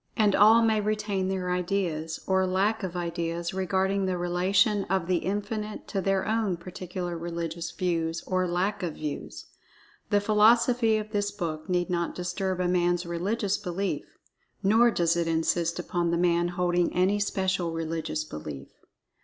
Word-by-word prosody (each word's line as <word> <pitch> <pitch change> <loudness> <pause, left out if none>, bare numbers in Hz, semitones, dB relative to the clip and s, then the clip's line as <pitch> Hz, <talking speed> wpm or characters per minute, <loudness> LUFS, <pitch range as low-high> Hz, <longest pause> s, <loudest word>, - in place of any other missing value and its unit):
And 210 -3 +4
all 220 +3 +6
may 220 -1 +3
retain 210 -2 -1
their 185 -1 -2
ideas, 175 -4 -1
or 190 0 +2
lack 200 +4 +1
of 185 -3 -4
ideas, 170 0 -3
regarding 190 +1 0
the 185 -1 -1
relation 185 +4 +2
of 190 -2 0
The 180 0 +1
Infinite 210 +3 -3
to 195 - -1
their 195 0 0
own 215 -5 0
particular 180 0 -5
religious 170 0 -4
views, 165 -3 -2
or 185 -1 0
lack 190 +4 -1
of 170 -4 -3
views. 150 -2 -6 0.6
The 205 - +4
philosophy 225 +2 +4
of 215 0 -5
this 205 -1 0
book 170 -5 -5
need 180 0 0
not 170 -1 -1
disturb 185 +1 -2
a 180 - +1
man's 175 0 +1
religious 195 +4 -1
belief—nor 200 +3 -1
does 170 -6 +1
it 170 -1 0
insist 165 +1 0
upon 175 -1 -1
the 170 - +1
man 175 0 +2
holding 175 0 +1
any 190 +3 +2
special 190 -3 0
religious 160 -1 -3
belief. 75 - -8
185 Hz, 155 wpm, -27 LUFS, 170-200 Hz, 0.6 s, all